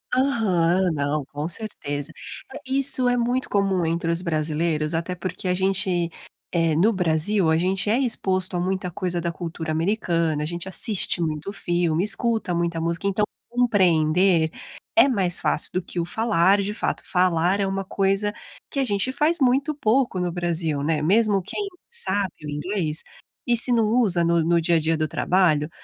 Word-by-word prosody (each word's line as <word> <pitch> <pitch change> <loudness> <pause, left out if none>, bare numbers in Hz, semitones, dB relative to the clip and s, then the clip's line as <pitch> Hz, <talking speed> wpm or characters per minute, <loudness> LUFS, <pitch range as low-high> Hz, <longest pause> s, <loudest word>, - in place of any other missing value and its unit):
Aham, 190 -9 +2
não, 145 0 -1
com 145 +3 -5
certeza. 165 -7 -4 0.4
Eh, 275 - -7
isso 265 -1 +2
é 245 - +2
muito 245 +2 0
comum 195 -4 +1
entre 165 +1 -1
os 170 +2 0
brasileiros, 155 -1 -1
até 170 +2 -2
porque 185 +1 -5
a 180 - +2
gente, 190 -2 0 0.4
eh, 165 -2 +1
no 200 +9 +3
Brasil, 175 0 +1
a 160 - +3
gente 190 +4 0
é 240 - +2
exposto 190 -7 +1
a - - -1
muita 185 0 -2
coisa 175 0 -3
da 170 0 -2
cultura 165 -2 -5
americana; 165 -3 0
a - - -2
gente 175 +2 -1
assiste 190 -2 -1
muito 155 +4 -3
filme, 175 -3 0
escuta 215 -3 0
muita 170 -1 -1
música, 170 +3 -2
então 200 +2 0 0.3
compreender 180 -7 +3 0.5
é 335 - +6
mais 190 -9 +2
fácil - - +1
do 185 - 0
que 175 0 -5
o 170 - -1
falar, 200 -1 +2
de 205 +2 -3
fato. - - -2
Falar 180 +1 +1
é 195 - +1
uma 195 0 -3
coisa 195 +2 0 0.4
que 275 - -2
a - - +2
gente 210 +2 -1
faz 300 +6 +2
muito 275 +3 +2
pouco 240 -6 +1
no 175 -1 -1
Brasil, 165 -4 -1
né. 150 0 0
Mesmo 205 +4 +3
quem 405 - -4 0.2
sabe 205 - 0
o - - -5
inglês, 155 +1 -2 0.4
e 240 -1 +2
se 240 +2 +2
não 230 -2 +3
usa 210 -7 +2
no 170 -1 +2
no 170 +1 +2
dia 165 0 +2
a - - +2
dia 160 +1 0
do 155 -1 -1
trabalho, 165 -5 +1
180 Hz, 180 wpm, -23 LUFS, 165-210 Hz, 0.5 s, é